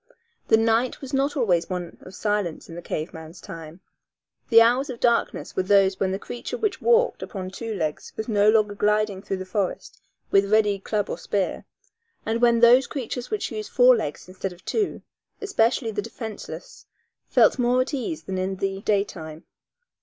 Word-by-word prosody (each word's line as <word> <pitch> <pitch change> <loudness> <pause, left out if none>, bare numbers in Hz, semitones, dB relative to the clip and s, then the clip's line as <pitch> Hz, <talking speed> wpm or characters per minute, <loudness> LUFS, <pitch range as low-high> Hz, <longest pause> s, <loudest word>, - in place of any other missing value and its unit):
The 220 - +5
night 225 +2 +1
was 270 0 -9
not 275 +2 +1
always 180 -10 +1
one 180 -2 -5
of 185 - -12
silence 205 -6 -2
in - - -10
the 175 - -7
cave 155 0 -4
man's 160 +2 -10
time. 165 +1 -10 0.7
The 230 -2 +8
hours 245 +5 +4
of 245 -2 -6
darkness 235 -1 0
were - - +2
those 195 0 +3
when 190 -1 +1
the 190 - -1
creature 245 - -6
which 425 -5 -2
walked 475 +1 +3
upon 185 -3 -6
two 225 +2 -5
legs 155 -5 -3
was 220 - -4
no 210 -2 +4
longer 215 -2 +3
gliding 210 -1 +1
through 195 -1 -3
the 185 - -6
forest 185 0 -3 0.3
with 200 +1 +3
ready 210 -2 +3
club 205 +1 -2
or - - -5
spear, 195 -3 -2 0.6
and 225 +1 -1
when 235 -1 +4
those 245 +2 +7
creatures 250 -3 -5
which 425 -9 -2
used 215 -2 -5
four 250 0 +6
legs 180 -8 -4
instead 185 0 -5
of 175 +1 -20
two, 425 -3 -1 0.4
especially 235 - +1
the 205 -1 -2
defenseless, 225 - -8 0.4
felt - - +4
more 245 +1 +3
at 260 - -3
ease 300 +4 -3
than 190 -1 -4
in 190 +1 -2
the 195 0 -3
daytime. 175 -6 -2
210 Hz, 185 wpm, -24 LUFS, 190-240 Hz, 0.7 s, The